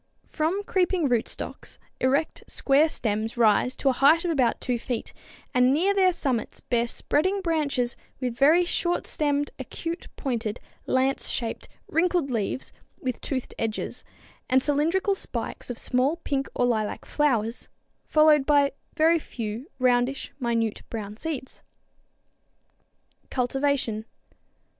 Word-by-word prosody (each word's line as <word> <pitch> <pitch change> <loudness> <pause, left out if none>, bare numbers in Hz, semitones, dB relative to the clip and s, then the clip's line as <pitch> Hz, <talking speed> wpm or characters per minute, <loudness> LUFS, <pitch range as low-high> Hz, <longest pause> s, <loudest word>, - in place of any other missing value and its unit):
_ - - -33
From 340 +6 -1
creeping 365 -5 +1
rootstocks 240 -3 -3 0.2
erect 280 +5 +1
square 285 +3 +3
stems 220 -2 -1
rise 235 +2 +4
to - - -2
a - - +3
height 310 +7 +5
of 345 - +1
about 255 -7 +2
2 245 -2 -1
feet, 240 -1 -4 0.4
and 250 +1 +4
near 355 +8 +3
their 380 -2 +4
summits 270 -9 -2
bear 235 -1 0
spreading 375 +11 +1
branches 290 -8 0 0.2
with 250 -3 -2
very 310 +8 +5
short 350 0 0
stemmed, 290 -1 0
acute 330 +6 -5
pointed, 235 -5 -2 0.3
lance 260 +1 +1
shaped, 230 -2 -3 0.2
wrinkled 335 -4 +1
leaves 230 +2 -2 0.3
with 255 -1 -3
toothed 260 -3 -3
edges, 220 -1 -3 0.5
and 260 0 +4
cylindrical 330 +8 +2
spikes 385 - -4
of 245 - -4
small 255 +6 +1
pink 280 -5 -2
or 245 - +2
lilac 220 -3 -1
flowers, 235 -6 0 0.3
followed 305 -2 +5
by 285 0 +4 0.2
very 330 +1 +4
few, 230 - -6
roundish, 250 +1 +1
minute, 230 -3 0
brown 210 -2 -5
seeds. 270 0 -6 1.7
_Cultivation. 255 -3 0
270 Hz, 130 wpm, -26 LUFS, 240-315 Hz, 1.7 s, height